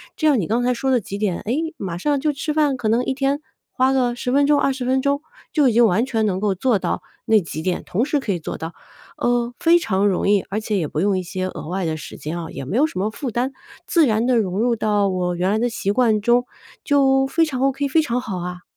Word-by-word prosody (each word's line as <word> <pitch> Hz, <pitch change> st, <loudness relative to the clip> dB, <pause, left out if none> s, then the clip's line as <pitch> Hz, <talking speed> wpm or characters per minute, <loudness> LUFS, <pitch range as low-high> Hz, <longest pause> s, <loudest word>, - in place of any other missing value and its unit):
这 310 Hz, -, +1 dB
样 285 Hz, -5 st, +4 dB
你 185 Hz, -, -1 dB
刚 230 Hz, +7 st, 0 dB
才 250 Hz, +1 st, +2 dB
说 265 Hz, +3 st, -1 dB
的 255 Hz, -, +4 dB
几 200 Hz, -2 st, -6 dB
点， 200 Hz, -4 st, -1 dB
哎， 225 Hz, -, 0 dB, 0.2 s
马 175 Hz, -3 st, -4 dB
上 285 Hz, +9 st, 0 dB
就 300 Hz, +2 st, 0 dB
吃 285 Hz, +3 st, -3 dB
饭， 295 Hz, -3 st, +2 dB
可 235 Hz, -4 st, -2 dB
能 235 Hz, +3 st, +2 dB
一 -, -, 0 dB
天 275 Hz, +1 st, 0 dB, 0.3 s
花 260 Hz, +1 st, +2 dB
个 250 Hz, -2 st, +1 dB
10 245 Hz, +1 st, -4 dB
分 285 Hz, +1 st, +4 dB
钟、 290 Hz, 0 st, +4 dB
20 270 Hz, -2 st, 0 dB
分 260 Hz, +1 st, +2 dB
钟 280 Hz, +1 st, 0 dB, 0.3 s
就 290 Hz, -4 st, +4 dB
已 -, -, 0 dB
经 235 Hz, +1 st, +5 dB
完 220 Hz, +3 st, +2 dB
全 225 Hz, -4 st, 0 dB
能 190 Hz, -3 st, 0 dB
够 205 Hz, -2 st, +1 dB
做 225 Hz, +4 st, +1 dB
到 -, -, -2 dB, 0.2 s
那 220 Hz, -1 st, +5 dB
几 165 Hz, -4 st, -6 dB
点， 180 Hz, +2 st, -1 dB
同 210 Hz, +7 st, 0 dB
时 295 Hz, +1 st, 0 dB
可 215 Hz, -7 st, -2 dB
以 175 Hz, -, -3 dB
做 160 Hz, -, -5 dB
到。 165 Hz, +2 st, -6 dB, 0.4 s
呃， 240 Hz, 0 st, 0 dB
非 340 Hz, +1 st, +5 dB
常 200 Hz, -, +1 dB
容 190 Hz, -, 0 dB
易， 205 Hz, -1 st, +4 dB
而 205 Hz, -, -1 dB
且 215 Hz, -1 st, -2 dB
也 175 Hz, -, 0 dB
不 155 Hz, -, -3 dB
用 195 Hz, +2 st, +2 dB
一 185 Hz, -, -2 dB
些 185 Hz, +1 st, -4 dB
额 185 Hz, -, -7 dB
外 185 Hz, 0 st, -2 dB
的 160 Hz, -1 st, -1 dB
时 155 Hz, -, -9 dB
间 155 Hz, +3 st, -5 dB
哦， 165 Hz, -1 st, -6 dB
也 135 Hz, -, -6 dB
没 145 Hz, -, -4 dB
有 275 Hz, +5 st, +4 dB
什 185 Hz, -, -6 dB
么 205 Hz, +3 st, 0 dB
负 250 Hz, +3 st, -5 dB
担， 250 Hz, +4 st, -1 dB, 0.3 s
自 335 Hz, -3 st, +4 dB
然 220 Hz, -2 st, +1 dB
地 255 Hz, -, +3 dB
融 195 Hz, -3 st, 0 dB
入 235 Hz, +1 st, +2 dB
到 210 Hz, -2 st, +1 dB
我 180 Hz, -2 st, -1 dB
原 180 Hz, +2 st, 0 dB
来 210 Hz, +2 st, +1 dB
的 245 Hz, +2 st, +1 dB
习 225 Hz, -4 st, -2 dB
惯 225 Hz, -3 st, +3 dB
中， 240 Hz, +3 st, +2 dB, 0.4 s
就 270 Hz, -2 st, +3 dB
非 325 Hz, +4 st, +2 dB
常 265 Hz, -5 st, -4 dB
OK， 275 Hz, +1 st, +1 dB
非 320 Hz, +4 st, +3 dB
常 245 Hz, -5 st, -1 dB
好 210 Hz, -7 st, -5 dB
啊！ 180 Hz, 0 st, -6 dB
235 Hz, 290 characters per minute, -21 LUFS, 195-270 Hz, 0.4 s, 经